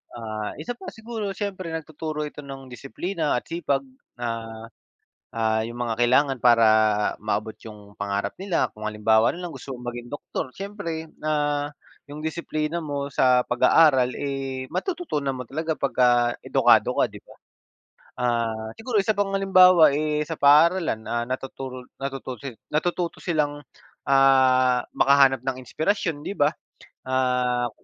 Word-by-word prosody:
Ah, 110 -2 -5
isa 155 +10 -5
pa, - - -12
siguro 220 -2 -5
siyempre 190 -3 -4
nagtuturo 155 -1 -4
ito 150 0 -7
ng 135 -1 -9
disiplina 155 +6 -3
at 125 - -2
sipag, 145 -5 -1 0.4
ah, 115 -1 -5 0.6
ah 110 -1 0
'yong 120 +2 -6
mga 120 -2 -1
kailangan 130 +3 +2
para 120 -2 +6 0.6
maabot 105 +1 -2
'yong 105 -2 -12
pangarap 100 0 -3
nila. 190 -2 0
Kung 110 - -13
halimbawa 110 +1 +3
na 175 +1 -6
lang 170 - -7
gusto 135 +1 -10
mong 125 - -11
maging 120 0 -8
doktor, 145 -2 -5
siyempre, 180 -2 -6 0.2
ah, 145 -1 0 0.4
'yong 145 - -8
disiplina 160 0 -3
mo 145 -2 -3
sa 125 -1 +4
pag-aaral, 130 +1 +4
eh, 135 -2 -4
matututunan 150 - -2
mo 125 - -6
talaga 160 +4 -3
pagka 120 -3 +2
edukado - - +3
ka, - - +5
'di - - -12
ba? - - -17 0.8
Ah, 115 -2 -1
siguro 225 -1 -1
isa 210 +2 +2
pang 200 -1 0
halimbawa, 185 -5 +6
eh, 150 0 -1
sa 160 - -4
paaralan, 150 -4 +4
ah, 120 0 -1
natuturo 130 0 -6 0.2
natututo 135 -1 -5 0.2
natututo 175 +2 -1
silang, 145 -4 -1 0.5
ah, 130 -2 +4
makahanap 135 -2 +4
ng 130 -1 -2
inspirasyon, 160 - -1
'di - - -3
ba? 145 -5 +3 0.6
Ah, 125 -1 +1
135 Hz, 140 wpm, -24 LUFS, 120-160 Hz, 0.8 s, para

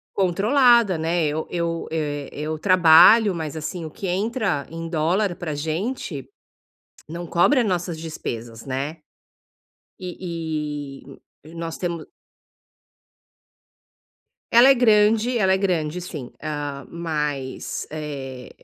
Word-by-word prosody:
Controlada, 210 - +4
né. 165 +1 0
Eu 155 +2 -2
eu, 170 -1 -2
eh, 145 -3 -3
eu 155 +1 -4
trabalho, 185 +4 +6
mas 160 -1 -5
assim, 155 +3 -5
o 155 - -7
que 195 - -6
entra 195 - -1
em 165 0 -6
dólar 175 +4 0
pra 160 -3 -5
gente 160 - -3 0.8
não 170 +2 -6
cobre 175 - +3
as 230 - +1
nossas 175 -3 -2
despesas, 115 -8 -6
né. 140 +4 -3 1.0
E 155 -6 -5
e 135 - -13 0.3
e - - -14
nós 165 -1 -5
temo 170 -3 -4 2.5
Ela 240 +3 +8
é - - +8
grande, 225 0 +3
ela 190 -3 +3
é - - +3
grande 180 -4 -1
sim, 150 -8 -7
ah, 145 -3 -4
mas, 150 -5 -3
eh, 140 -4 -6
165 Hz, 120 wpm, -23 LUFS, 150-190 Hz, 2.5 s, Ela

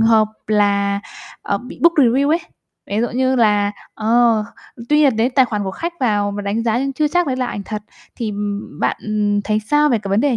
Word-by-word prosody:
hợp 225 -1 +4 0.2
là, 200 -1 +1 0.4
ờ, 200 - -1
bị 250 +4 -11
book 335 0 +6
review 275 0 +3
ấy. 330 +3 +2 0.5
Ví 205 +2 -1
dụ 240 - 0
như 260 +1 +1
là 205 -3 +3 0.2
ờ, 225 0 +2 0.4
tuy 300 - +3
nhiên 275 -7 +4
đến 240 +3 +1
tài 265 - +6
khoản 210 -4 -3
của 190 - -2
khách 335 - -4
vào 205 -5 +1
và 205 - -4
đánh 205 +3 -1
giá 230 0 +1
nhưng 275 +1 -1
chưa 300 +3 0
chắc 350 +2 +1
đấy 260 - -1
là 255 -1 -1
ảnh 205 - -5
thật 210 0 -5 0.3
thì, 225 -3 -3
ừm, 205 -6 -5
bạn, - - +1
ừm, 205 -1 0
thấy 215 +1 0
sao 295 +7 +2
về 235 -4 +2
cái 200 - -7
vấn 200 +3 +3
đề 275 -3 +2
225 Hz, 230 wpm, -19 LUFS, 205-260 Hz, 0.5 s, book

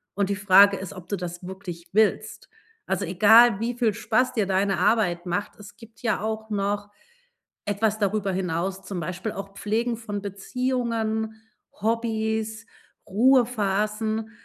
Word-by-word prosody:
Und 200 -1 0
die 200 - 0
Frage 200 0 +6
ist, 190 -2 -7
ob 185 -3 -11
du 200 - -2
das 175 0 -6
wirklich 180 -2 -8
willst. 215 +2 0 0.4
Also, 200 - -1
egal, 210 +5 +6
wie 235 +2 -1
viel 230 -3 +1
Spaß 230 +4 0
dir 220 -4 +1
deine 195 0 +1
Arbeit 180 -6 +1
macht, 180 +3 -3
es 205 -1 -13
gibt 225 -1 -16
ja 220 -5 0
auch 220 0 -4
noch 205 0 -2 0.7
etwas 210 +1 0
darüber 200 -1 0
hinaus, 185 +1 -2
zum 190 -3 -5
Beispiel 185 +6 -4
auch 195 0 -7
Pflegen 220 +4 -1
von 205 -3 -5
Beziehungen, 220 +1 -2 0.4
Hobbys, 220 0 -1 0.4
Ruhephasen. 220 -1 +1
210 Hz, 140 wpm, -25 LUFS, 195-220 Hz, 0.7 s, Frage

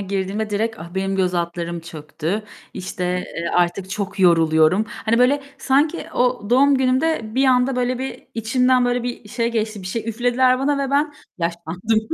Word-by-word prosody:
girdiğimde 200 +2 -2
direkt, 220 +2 -1
ah, 170 +2 -10
benim 195 0 -1
göz 185 -1 +1
altlarım 170 0 -3
çöktü, 165 +4 -4 0.3
işte, 185 0 -4 0.3
eee, 170 0 -2
artık 180 +2 +1
çok 200 0 -4
yoruluyorum. 165 +2 +4
Hani 230 +1 -1
böyle, 275 +3 +3 0.2
sanki, 290 +6 +1
o 245 -3 0
doğum 275 +3 +5
günümde 260 -3 0
bir 265 +2 +3
anda 255 0 +3
böyle 250 0 0
bir 265 +1 -6
içimden 250 +3 +2
böyle 245 0 0
bir 240 -3 -5
şey 235 +1 -1
geçti 215 -2 -2
bir 185 - -7
şey 230 +4 -3
üflediler 245 +3 +2
bana 280 +1 +1
ve - - -6
ben 290 +2 +1 0.3
yaşlandım 170 +5 -1
220 Hz, 170 wpm, -21 LUFS, 185-255 Hz, 0.3 s, doğum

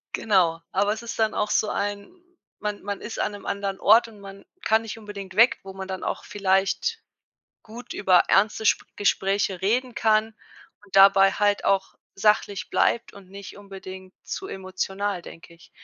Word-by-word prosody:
Genau, 175 -6 +2
aber 205 +2 +1
es 220 +2 -8
ist 225 - -7
dann 220 -1 +2
auch 210 - -1
so 215 - +1
ein 200 0 -3 0.5
man 210 0 -4
man 200 0 -5
ist 220 - -7
an 210 - -1
'nem 205 - -10
anderen 200 -1 -3
Ort 225 +3 +5
und 215 -3 -15
man 195 0 -12 0.2
kann 220 0 +3
nicht 225 0 -7
unbedingt 200 -3 -9
weg, 230 +3 +5
wo 195 0 -9
man 190 0 -7
dann 190 -1 -5
auch - - -3
vielleicht 200 - 0 0.6
gut 235 +3 -10
über 185 -3 +4
ernste 215 +2 +2
Sp - - +2
Gespräche 195 -2 0
reden 240 +5 0
kann 220 0 +1 0.5
und 195 -1 -10
dabei 195 0 +7
halt 205 -1 +1
auch 195 -1 0 0.2
sachlich 205 -1 +1
bleibt 235 - +1
und 195 -2 -15
nicht 200 0 -10
unbedingt 190 -2 -11
zu 385 - -6
emotional, 190 +1 -4
denke 170 0 -13
ich. 170 - -19
200 Hz, 175 wpm, -24 LUFS, 190-215 Hz, 0.6 s, dabei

